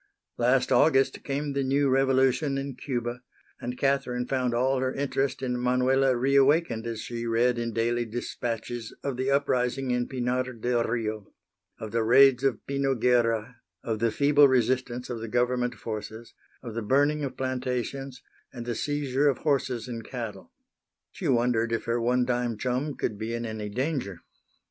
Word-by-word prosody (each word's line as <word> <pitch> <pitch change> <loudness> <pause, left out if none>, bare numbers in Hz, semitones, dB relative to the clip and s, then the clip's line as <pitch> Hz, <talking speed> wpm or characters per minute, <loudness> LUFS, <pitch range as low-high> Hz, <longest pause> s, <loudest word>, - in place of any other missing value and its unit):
Last 125 +3 +2
August 135 +1 +3
came 140 +1 -2
the 140 0 0
new 140 +2 +2
revolution 135 +1 +2
in 135 0 -4
Cuba, 120 -2 -4 0.4
and 125 +1 -5
Catherine 125 -3 0
found 130 -1 0
all 130 +2 +2
her 130 0 0
interest 135 -1 -1
in 125 -1 -1
Manuela 125 +1 +2
reawakened 135 -2 +3
as 115 -1 -4
she 120 -1 -5
read 120 +1 +2
in 115 0 -2
daily 120 +1 0
dispatches 115 0 -5
of 140 -2 -2
the 130 +2 -1
uprising 135 -2 +1
in 125 0 0
Pinar 125 0 -1
del 120 +1 0
Rio, 110 -3 -3 0.5
of 110 - -7
the 115 - +1
raids 130 +2 +6
of 135 -3 0
Pino 140 -1 0
Guerra, 120 -1 +1 0.3
of 110 -2 -2
the 115 +1 +2
feeble 145 +4 +5
resistance 125 -1 0
of 120 - -4
the 115 - -5
Government 125 +1 0
forces, 110 +1 -7 0.3
of 115 -3 -6
the 115 - -3
burning 145 +6 +2
of 135 - -4
plantations 130 +1 -3 0.3
and 120 - -7
the 120 - -2
seizure 145 +1 0
of 135 - 0
horses 130 -5 -1
and 115 -2 -6
cattle. 115 -6 -7 0.6
She - - -5
wondered 120 -2 +2
if 115 - -1
her 115 +1 0
one 125 +1 +2
time 120 -2 -1
chum 130 +5 -2
could 105 -3 -3
be 115 +1 -3
in 120 0 -3
any 110 -2 -5
danger. 125 - -3
125 Hz, 165 wpm, -27 LUFS, 115-135 Hz, 0.6 s, raids